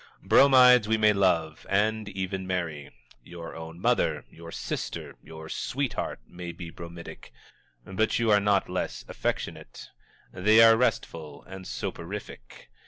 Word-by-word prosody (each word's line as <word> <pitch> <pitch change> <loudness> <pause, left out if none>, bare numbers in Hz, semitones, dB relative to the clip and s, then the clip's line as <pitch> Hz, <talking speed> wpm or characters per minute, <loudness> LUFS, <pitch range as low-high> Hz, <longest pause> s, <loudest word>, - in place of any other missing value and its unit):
Bromides 125 -4 +6
we 110 0 +2
may 110 -1 +4
love, 85 -6 0
and 105 +1 +1
even 95 -1 -4
marry. 85 -6 -3 0.3
Your 85 +3 -9
own 80 +1 -9
mother, - - +1
your 85 0 -11
sister, - - -5
your 80 +1 -11
sweetheart, 135 - -3
may 90 -1 -8
be 85 -1 -9
bromidic, 85 0 -10 0.5
but 110 +3 0
you 115 -2 +2
are 105 - +6
not 100 -1 +2
less - - -4
affectionate. - - -5 0.4
They 105 +4 +4
are 115 0 +8
restful 80 -10 -2
and 95 0 -10
soporific. 85 -8 -7
95 Hz, 130 wpm, -27 LUFS, 85-110 Hz, 0.5 s, are